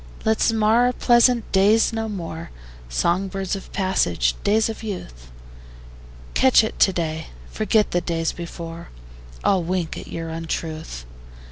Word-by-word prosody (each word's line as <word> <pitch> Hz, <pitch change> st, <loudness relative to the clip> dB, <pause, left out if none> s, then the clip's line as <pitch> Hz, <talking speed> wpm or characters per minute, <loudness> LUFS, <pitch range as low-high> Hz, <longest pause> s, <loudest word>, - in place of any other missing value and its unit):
Let's 220 Hz, +1 st, +3 dB
mar 225 Hz, +2 st, +3 dB
our 250 Hz, -, 0 dB
pleasant 240 Hz, -1 st, +3 dB
days 210 Hz, +4 st, +4 dB
no 225 Hz, 0 st, -2 dB
more, 170 Hz, -4 st, -6 dB, 0.4 s
Song 170 Hz, -, +1 dB
birds 195 Hz, 0 st, -3 dB
of 195 Hz, -, -9 dB
passage, 90 Hz, -, +1 dB
days 215 Hz, +2 st, +3 dB
of 225 Hz, -, -6 dB
youth: 60 Hz, -, -7 dB, 1.0 s
Catch 260 Hz, -4 st, +5 dB
at 220 Hz, -, -4 dB
to 190 Hz, -, +5 dB
day, 160 Hz, -3 st, -3 dB, 0.2 s
forget 215 Hz, 0 st, +1 dB
the 175 Hz, -, +1 dB
days 165 Hz, -2 st, -1 dB
before: 170 Hz, -1 st, -8 dB, 0.5 s
I'll 190 Hz, -2 st, +3 dB
wink 175 Hz, -1 st, -2 dB
at -, -, -10 dB
your 165 Hz, 0 st, -5 dB
untruth. 160 Hz, -, -5 dB
185 Hz, 140 wpm, -22 LUFS, 165-220 Hz, 1.0 s, Catch